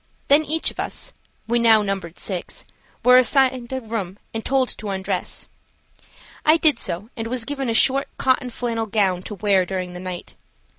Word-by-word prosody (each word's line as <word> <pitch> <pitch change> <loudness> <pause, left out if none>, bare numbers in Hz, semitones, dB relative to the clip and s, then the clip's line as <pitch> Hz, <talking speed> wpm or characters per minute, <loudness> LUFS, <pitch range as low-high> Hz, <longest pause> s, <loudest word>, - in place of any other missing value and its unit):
Then 290 +3 +6
each 315 +2 0
of - - -15
us–we 240 - -4
now 225 -2 +6
numbered 195 -4 -4
six–were 215 +6 0
assigned 255 -1 +3
a 260 0 -2
room 210 -5 -4 0.2
and 225 0 -3
told 265 -1 +1
to 210 - -4
undress. 195 0 -3 1.0
I 310 +2 +5
did 300 -7 +3
so, 200 +8 -3
and 225 -1 -4
was 240 0 -2
given 275 -1 -3
a 225 - 0
short, 275 +4 +4
cotton 260 -1 +1
flannel 230 -2 -3
gown 195 -4 +1
to 210 - -7
wear 195 -1 +3
during 180 -1 -4
the 180 - -7
night. 180 -1 -7
225 Hz, 165 wpm, -22 LUFS, 195-260 Hz, 1.0 s, Then